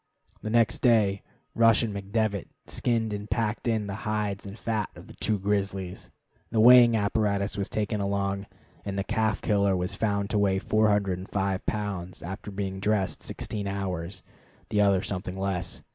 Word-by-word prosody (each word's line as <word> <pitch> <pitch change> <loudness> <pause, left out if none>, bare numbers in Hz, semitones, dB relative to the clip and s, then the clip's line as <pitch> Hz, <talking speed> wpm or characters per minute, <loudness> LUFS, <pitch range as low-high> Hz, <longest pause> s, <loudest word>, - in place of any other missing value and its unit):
The 110 - -4
next 115 -1 +3
day 105 -5 +3 0.3
Rush 115 0 +5
and 110 -3 -2
McDevitt 100 0 -1 0.2
skinned 115 -3 0
and 105 +1 -5
packed 115 0 -1
in 110 -2 +1
the 100 +1 -4
hides 105 -2 -2
and 100 +2 -8
fat 110 -4 -2
of - - -12
the - - -13
two 110 -1 0
grizzlies. 95 -2 -2 0.4
The 110 - 0
weighing 120 0 +8
apparatus 100 -1 0
was 100 -1 -2
taken 105 -1 -1
along, 100 0 -1 0.4
and 100 -1 -4
the 100 - 0
"calf 110 0 0
killer" 100 -3 +2
was 90 +2 -2
found 100 -1 -1
to 105 - +2
weigh 100 -2 +2
405 100 -2 +1
pounds 100 -4 -3
after 95 +5 -6
being 95 -1 -4
dressed 105 -1 0
sixteen 105 -2 -4
hours, 95 -2 -4 0.5
the 105 - +2
other 100 -2 +3
something 95 -1 -4
less. 95 -2 -3
100 Hz, 160 wpm, -27 LUFS, 95-110 Hz, 0.5 s, weighing